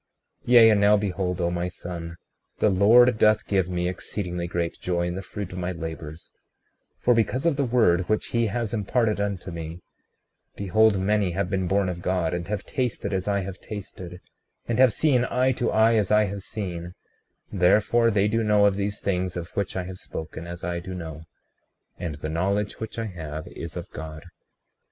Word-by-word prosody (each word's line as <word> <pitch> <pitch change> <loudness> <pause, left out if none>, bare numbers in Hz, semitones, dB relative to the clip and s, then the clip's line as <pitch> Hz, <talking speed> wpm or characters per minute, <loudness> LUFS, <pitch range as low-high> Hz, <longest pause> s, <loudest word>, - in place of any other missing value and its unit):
36:25 - - -3
Yea, 115 -2 +9
and 105 -1 +3
now 105 +1 +6
behold, 95 -3 -2
O 85 -1 +1
my 90 +1 -2
son, 85 -2 -7 0.4
the 105 - +3
Lord 110 +4 +6
doth 110 0 +4
give 95 -3 +1
me 90 -1 -1
exceedingly 90 -1 -4
great 85 -1 -3
joy 85 -1 -1
in 90 - -2
the 95 - -4
fruit 100 0 -6
of 90 - -5
my 90 0 -2
labors; 80 -2 -7 0.7
36:26 - - -33
For 125 - +5
because 115 +5 0
of 165 -4 +3
the 140 -1 0
word 110 -8 +2
which 110 - +1
he 115 -1 +1
has 115 +1 -2
imparted 110 0 +1
unto 100 -2 -3
me, 85 0 -6 0.8
behold, 105 +2 +3
many 100 -2 +1
have 95 +1 -2
been 95 -2 0
born 100 +1 +2
of 90 -1 -4
God, 90 -2 0
and 85 -1 -3
have 105 -1 -3
tasted 120 -5 -2
as 95 0 -2
I 100 -1 +1
have 95 -1 -6
tasted, 90 -4 -8 0.5
and 120 +1 -1
have 130 -2 +7
seen 130 +1 +2
eye 130 +1 +2
to 120 -1 -1
eye 110 +1 +4
as 105 -3 +1
I 105 0 +5
have 100 -1 -4
seen; 90 -4 -6 0.6
therefore 105 +5 +3
they 100 -2 +2
do 115 +2 +1
know 105 -1 +4
of 100 -1 +3
these 100 0 -2
things 90 -2 -1
of 85 -1 -7
which 100 -2 -2
I 95 - -1
have 90 0 -8
spoken, 80 +1 -7
as 85 0 -8
I 85 0 -2
do 95 +1 -7
know; 80 -2 -7 0.7
and 85 -4 -4
the 75 +1 -5
knowledge 100 +5 -1
which 110 - -6
I 115 - -2
have 80 -6 -6
is - - -7
of - - -6
God. 80 -1 -8
95 Hz, 200 wpm, -25 LUFS, 90-105 Hz, 0.8 s, Yea